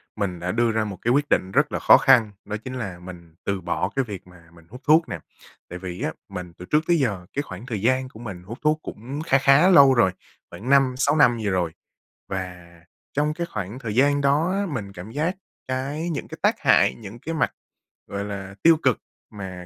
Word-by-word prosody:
mình 95 -5 -2
đã 90 +1 -2
đưa 120 0 +2
ra 110 0 0
một 100 -4 -6
cái 120 - +1
quyết 145 +2 +3
định 95 - +1
rất - - +2
là - - -2
khó - - +7
khăn, 120 -6 +5
đó 105 +1 -4
chính 130 - -6
là 100 -8 -5
mình 85 -2 -12
từ 100 -1 -1
bỏ 85 - -1
cái 135 -2 +1
việc 95 -4 -8
mà 85 -2 -18
mình 85 -1 -18
hút 125 +3 -11
thuốc 160 +2 +4
nè. - - -4 0.5
Tại 90 +1 -7
vì 90 -1 -6
á, - - -1 0.2
mình 90 -2 -7
từ 90 - -9
trước 150 +9 +2
tới 170 -1 +4
giờ, 100 -10 -1
cái 140 - 0
khoảng 95 -3 -9
thời 110 -6 -4
gian 130 +3 +1
của 110 - -14
mình 100 -7 -8
hút 110 +6 -8
thuốc 155 +1 +2
cũng 135 +7 -6
kha 135 - +4
khá 140 +6 +5
lâu 140 -7 +8
rồi, 115 -7 +4 0.4
khoảng 120 +6 -8
5-6 140 +1 +3
năm 120 -6 +5
gì 105 -2 -1
rồi. 90 -3 0 0.6
Và 90 -2 -5 0.5
trong 150 +2 +1
cái 170 +1 -4
khoảng 100 +4 -5
thời 110 -5 -5
gian 145 +3 +3
đó 145 +6 +2
á, 200 +1 0
mình 110 - -5
cảm 95 +4 -9
giác 160 +8 -1 0.3
cái 140 +6 -3
những 155 - -4
cái - - -9
tác - - +3
hại, - - +4
những 110 +1 -10
cái 165 +6 -5
mặt, 130 -8 +1 0.6
gọi 100 0 -4
là, 100 -1 -6
tiêu 165 -1 +7
cực 130 -3 +3 0.3
mà 95 -4 -8
115 Hz, 230 wpm, -24 LUFS, 95-140 Hz, 0.6 s, lâu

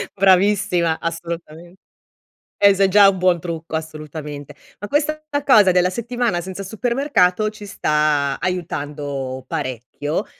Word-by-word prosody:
Bravissima 190 -3 +3
assolutame 170 0 -6 0.8
eh, 200 -1 +6
se 195 0 +3
già 200 +1 +7
un 195 -1 +1
buon 180 -1 +2
trucco 165 -1 -6
assolutamente. 150 -2 -6 0.2
Ma 205 - -6
questa 305 +4 0 0.2
cosa 210 -9 +6
della 180 0 +3
settimana 235 -2 -2
senza 190 +2 -7
supermercato 220 -2 +1
ci 215 -1 -11
sta 150 -6 0
aiutando 145 -7 -4
parecchio, 145 - -4
180 Hz, 115 wpm, -20 LUFS, 155-200 Hz, 0.8 s, già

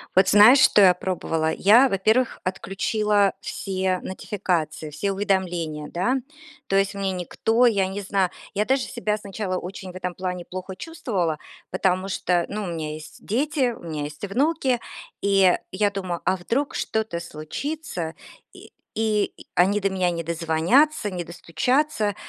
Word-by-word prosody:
Вот 190 +1 +5
знаешь, 215 +7 +8
что 210 - +6
я 185 -2 +8
пробовала? 165 -3 -1
Я, 230 +10 +5
во-первых, 220 +5 +1
отключила 200 +2 +1
все 190 -1 -2
нотификации, 175 -6 -3
все 150 +7 -2
уведомления, 180 -6 -1
да. 185 +9 +1 0.5
То 195 - 0
есть 195 +1 +2
мне 195 -1 -1
никто 220 +6 +1
я 200 -5 +3
не 195 +2 -5
знаю, 195 -1 +1 0.2
я 205 +1 0
даже 265 +1 +2
себя 215 -3 -2
сначала 200 -2 -4
очень 185 +1 -7
в - - -17
этом 180 -1 -4
плане 180 -1 -4
плохо 185 +1 -7
чувствовала, 190 - -2 0.3
потому 185 0 +1
что, 180 -3 0
ну, 210 +1 -3
у - - -4
меня 160 -3 -4
есть 155 0 -11
дети, 265 +2 +1
у 230 - -10
меня 155 -3 -4
есть 150 +3 -8
внуки, 265 +3 +1 0.4
и 195 -2 +4 0.2
я 205 +2 +1
думаю: 185 -3 -4
"А - - +3
вдруг 245 +11 -2
что-то 220 -6 -2
случится, 170 - -5 0.4
и - - -14 0.3
и 215 -2 +1 0.2
они 195 +4 +3
до 195 -1 0
меня 185 -2 +1
не 170 -1 -3
дозвонятся, 170 - +2
не 180 -2 -3
достучаться". 205 - 0
190 Hz, 155 wpm, -24 LUFS, 175-215 Hz, 0.5 s, знаешь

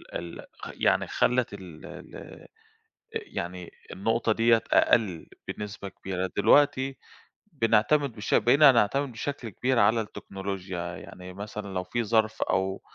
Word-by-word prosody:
ال 85 0 -6
خ - - -7
يعني - - +2
خلّت 125 -3 +1
ال 90 -6 -10
ال - - -11
أ - - -11 0.7
يعني 90 - -5 0.2
النقطة 115 +4 0
دِيَّة 115 0 +4
أقل 95 -8 +3 0.2
بنسبة 100 -1 -6
كبيرة. 95 -1 -4
دلوقتي 135 +4 +4 0.6
بنعتمد 120 +3 +2
بش 105 - -4
بقينا 140 +3 +6
نعتمد 130 +5 +2
بشكل 120 0 -5
كبير 125 +5 0
على 110 +3 +4
التكنولوجيا، 95 -3 -6 0.2
يعني 90 0 -10
مثلًا، 100 +1 -7
لو 90 - -1
فيه 120 +6 -2
ظرف 110 0 +1
أو 95 0 -1
105 Hz, 130 wpm, -27 LUFS, 95-120 Hz, 0.7 s, بقينا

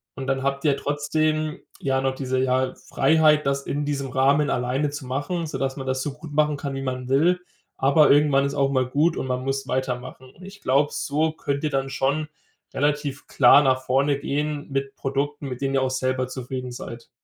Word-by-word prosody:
Und, 135 - -5
dann 135 0 0
habt 140 +1 -2
ihr 145 -2 +4
trotzdem 155 +1 -1 0.2
ja 135 -1 0
noch 135 0 0
diese, 130 -1 -1
ja, 130 0 +1 0.2
Freiheit, 150 +1 +4
das 140 0 0
in 145 +1 -1
diesem 140 -2 -2
Rahmen 140 +3 +3
alleine 130 +4 0
zu 145 -1 -7
machen, 145 +7 -2
sodass 135 -3 -3
man 135 - -5
das 130 0 -1
so 145 - -3
gut 150 +1 -11
machen 150 0 +2
kann, 140 -1 -4
wie 135 - -4
man 130 -1 -4
will. 160 +7 +3 0.4
Aber, 140 +3 +4
irgendwann 145 -1 +4
ist 140 - -2
auch 140 0 +2
mal 130 -2 +1
gut 150 +5 +2
und - - -3
man 125 0 -2
muss 135 0 -2
weitermachen. 130 0 -4
Und, - - -20
ich 195 +2 -11
glaube, 140 +3 +2
so 155 +2 0
könnt 140 -2 -3
ihr 155 - +1
dann 135 -1 -1
schon 140 +4 0 0.5
relativ 145 -1 -1
klar 140 +2 +6
nach 130 -2 +2
vorne 135 +2 +2
gehen 150 0 -2
mit 135 0 -2
Produkten, 140 +2 -2
mit 125 +1 -6
denen 135 0 0
ihr 135 - +3
auch 130 - 0
selber 130 0 -1
zufrieden 130 0 -5
seid. 115 -1 -8
140 Hz, 205 wpm, -24 LUFS, 130-145 Hz, 0.5 s, klar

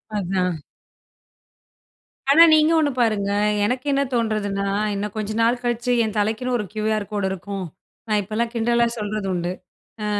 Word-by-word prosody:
அதான். 180 -3 -1 1.7
ஆனா, 325 +4 +8
நீங்க 310 +1 +5
1 295 -2 +2
பாருங்க. 205 -3 +1 0.3
எனக்கு 250 +5 -2
என்ன 275 0 +2
தோண்றதுன்னா, 215 -4 -1 0.3
இன்னும் 205 0 -4
கொஞ்ச 215 0 -3
நாள் 235 +2 +2
கழிச்சு 240 +1 -1
என் 220 0 -3
தலைக்குன்னு 220 +4 0
ஒரு 210 - -3
கியூஆர் 215 -1 -1
கோடு 205 -2 -1
இருக்கும். 195 +1 -5 0.4
நான் 210 -1 +2
இப்பல்லாம் 220 +4 -2
கிண்டலா 235 +1 +2
சொல்றது 210 -1 -3
உண்டு. 175 0 -2 0.5
ஆ - - -2
215 Hz, 140 wpm, -22 LUFS, 200-235 Hz, 1.7 s, ஆனா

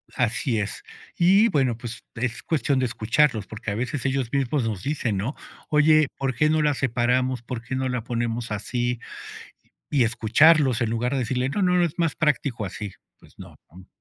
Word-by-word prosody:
Así 115 -1 0
es. 105 - -4 0.3
Y, 195 +6 +5
bueno, 130 - +1
pues, 120 -1 -8
es 120 0 -3
cuestión 140 -4 0
de 130 - +1
escucharlos, 115 0 +1
porque 110 0 -6
a - - -2
veces 130 +3 -3
ellos 135 -3 0
mismos 135 -1 0
nos 110 -5 -3
dicen, 130 -7 -1
¿no? 110 +10 -3 0.3
"Oye, 155 0 +5
¿por 135 -1 -1
qué 150 +4 +3
no 155 0 +2
la 150 -1 +2
separamos, 125 0 0
por 120 -1 -6
qué 120 +3 -5
no 130 0 -1
la 125 -2 -2
ponemos 115 -1 -3
así?". 120 +3 -2 0.9
Y 135 -4 +3
escucharlos, 125 +3 +4
en 115 - 0
lugar 120 +2 -1
de 140 - 0
decirle: 125 +1 -1
"No, 200 - -2
no, 180 -1 +3
es 170 -1 -4
más 165 -4 +1
práctico 140 -7 0
así", 100 +1 -6 0.3
pues - - -21
no, - - -12
¿no? 90 +3 -15
125 Hz, 190 wpm, -24 LUFS, 115-145 Hz, 0.9 s, Y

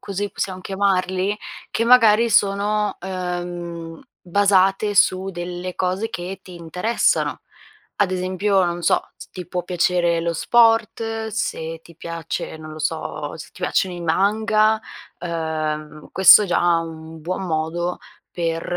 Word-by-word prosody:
così 200 +1 -4
possiamo 185 -1 -4
chiamarli? 190 0 0 0.3
Che 230 - 0
magari 230 -2 +6
sono, 205 +1 +2
uhm, 175 -3 -5 0.2
basate 195 +2 +2
su 185 0 +3
delle 175 0 -5
cose 190 +4 -1
che 180 +2 -6
ti 180 - -12
interessano, 180 +7 0 0.5
ad 190 -2 +1
esempio, 185 +2 +1
non 175 0 -2
so, - - +1
se - - -11
ti 180 - -7
può 180 -1 -3
piacere 175 -1 +1
lo 170 0 -1
sport, 225 +2 +2
se 165 -6 -3
ti 170 -1 -17
piace 165 -1 -5
non 155 0 -9
lo 155 - -9
so, 155 -1 -3
se 155 - -10
ti 185 - -13
piacciono 180 0 0
i - - -7
manga, 215 +5 +2 0.4
uhm, 155 -3 -4
questo 190 +3 +8
è - - -2
già 175 -1 +3
un 160 -1 -8
buon 180 +5 -3
modo 170 +2 -2 0.3
per 165 -1 -2
180 Hz, 135 wpm, -21 LUFS, 170-200 Hz, 0.5 s, questo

